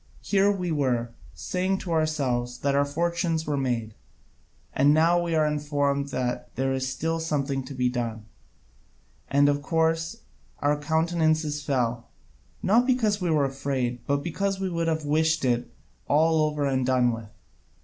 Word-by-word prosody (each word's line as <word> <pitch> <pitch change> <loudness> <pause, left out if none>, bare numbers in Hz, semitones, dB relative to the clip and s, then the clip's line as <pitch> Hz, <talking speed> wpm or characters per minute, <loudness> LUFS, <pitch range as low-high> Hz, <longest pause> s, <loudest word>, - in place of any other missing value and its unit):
Here 200 0 +3
we 180 -4 -2
were, 125 -6 0 0.2
saying 185 +1 -1
to 175 - -5
ourselves 135 -7 0
that 140 0 +1
our 140 +1 +3
fortunes 165 +2 -1
were 150 - -1
made, 120 -5 -2 0.8
and 145 +2 +4
now 170 +2 +4
we 170 -1 -1
are 155 -1 +3
informed 145 -2 0
there 130 +1 -2
is 130 0 -1
still 165 +4 -2
something 140 -4 -1
to 135 - -8
be 125 -1 +1
done, 115 -3 -3 1.0
and 140 +1 +4
of 145 0 +1
course 165 +6 0 0.3
our 145 +1 +1
countenances 160 -1 +1
fell, 120 -4 -1 0.5
not 235 +6 +4
because 220 -6 +1
we 180 - 0
were 150 -3 +3
afraid, 135 -3 -2
but 140 0 0
because 195 +4 -2
we 190 -1 -2
could 165 -1 -1
have 160 -2 -1
wished 160 0 +1
it 120 -1 0 0.4
all 160 +1 +3
over 150 -1 -2
and 130 -2 0
done 125 -2 +3
with. 115 -2 -7
150 Hz, 155 wpm, -26 LUFS, 130-165 Hz, 1.0 s, and